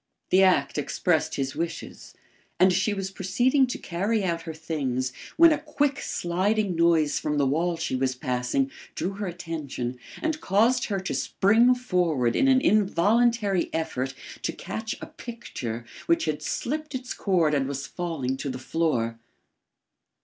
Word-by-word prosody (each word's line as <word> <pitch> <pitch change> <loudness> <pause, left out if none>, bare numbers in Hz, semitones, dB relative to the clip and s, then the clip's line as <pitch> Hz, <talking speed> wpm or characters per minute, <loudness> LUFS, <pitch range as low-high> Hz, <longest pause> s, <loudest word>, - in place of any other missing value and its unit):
The 190 - +6
act 180 -6 +3
expressed 160 +2 0
his 135 -1 -2
wishes; 165 +2 -5 0.4
and 185 0 +6
she 195 +4 +1
was 195 -1 -3
proceeding 245 +9 +2
to 250 - -4
carry 200 +5 -1
out 170 -2 -1
her - - -4
things 130 -5 -2 0.2
when 335 0 +8
a 300 - +2
quick 290 -2 0
sliding 190 +3 0
noise 165 -3 +3
from 150 -1 -1
the 140 - +3
wall 165 +5 +1
she 165 -5 -2
was 130 0 0
passing, 125 - -1 0.2
drew 185 - -2
her 200 0 -4
attention 155 -8 -5 0.2
and 315 0 -2
caused 245 -1 +3
her 200 -2 -1
to 190 - -3
spring 230 +6 +4
forward 175 - +1
in 270 - +3
an 260 -1 +5
involuntary 210 0 +3
effort 135 -5 -2 0.3
to - - -1
catch 220 0 -5
a - - -5
picture 120 - -7 0.2
which 170 -1 +3
had 155 -1 -2
slipped 300 - -3
its 255 -1 -4
cord 170 -6 +2
and 135 -2 +1
was 140 0 -4
falling 155 -7 -3
to 140 - -4
the 130 - -4
floor. 125 -5 -1
175 Hz, 155 wpm, -26 LUFS, 145-220 Hz, 0.4 s, when